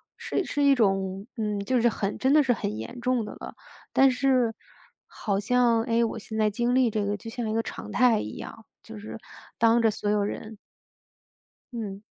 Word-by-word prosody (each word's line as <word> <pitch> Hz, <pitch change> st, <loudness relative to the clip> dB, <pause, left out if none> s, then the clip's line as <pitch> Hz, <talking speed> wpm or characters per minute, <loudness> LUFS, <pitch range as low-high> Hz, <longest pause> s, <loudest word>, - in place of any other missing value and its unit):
是 385 Hz, -, -2 dB
是 290 Hz, -, -1 dB
一 280 Hz, -1 st, +6 dB
种， 195 Hz, -3 st, 0 dB
嗯， 210 Hz, -3 st, -2 dB
就 255 Hz, -2 st, +2 dB
是 240 Hz, -, +4 dB
很 200 Hz, -2 st, -3 dB
真 265 Hz, +1 st, +1 dB
的 305 Hz, 0 st, +6 dB
是 255 Hz, -3 st, +2 dB
很 105 Hz, -, -3 dB
严 175 Hz, -, -7 dB
重 250 Hz, -3 st, +1 dB
的 -, -, -7 dB
了。 -, -, -9 dB, 0.4 s
但 270 Hz, 0 st, +5 dB
是 255 Hz, -3 st, +2 dB, 0.5 s
好 200 Hz, -2 st, -2 dB
像， 235 Hz, +2 st, +3 dB
哎， 235 Hz, -1 st, +1 dB
我 225 Hz, -, -4 dB
现 220 Hz, 0 st, -7 dB
在 215 Hz, -1 st, +3 dB
经 240 Hz, +4 st, 0 dB
历 255 Hz, -2 st, +4 dB
这 210 Hz, -1 st, -1 dB
个 205 Hz, 0 st, -1 dB
就 225 Hz, -, -9 dB
像 225 Hz, -1 st, -4 dB
一 -, -, -1 dB
个 225 Hz, -, +1 dB
常 -, -, -8 dB
态 245 Hz, -3 st, +4 dB
一 105 Hz, -, -7 dB
样， -, -, -9 dB, 0.2 s
就 110 Hz, -, -11 dB
是 110 Hz, +1 st, -8 dB, 0.4 s
当 230 Hz, +1 st, +4 dB
着 225 Hz, -1 st, +3 dB
所 205 Hz, 0 st, -3 dB
有 210 Hz, -1 st, +2 dB
人。 215 Hz, +1 st, -5 dB, 1.2 s
嗯。 205 Hz, -3 st, -5 dB
225 Hz, 215 characters per minute, -26 LUFS, 205-245 Hz, 1.2 s, 一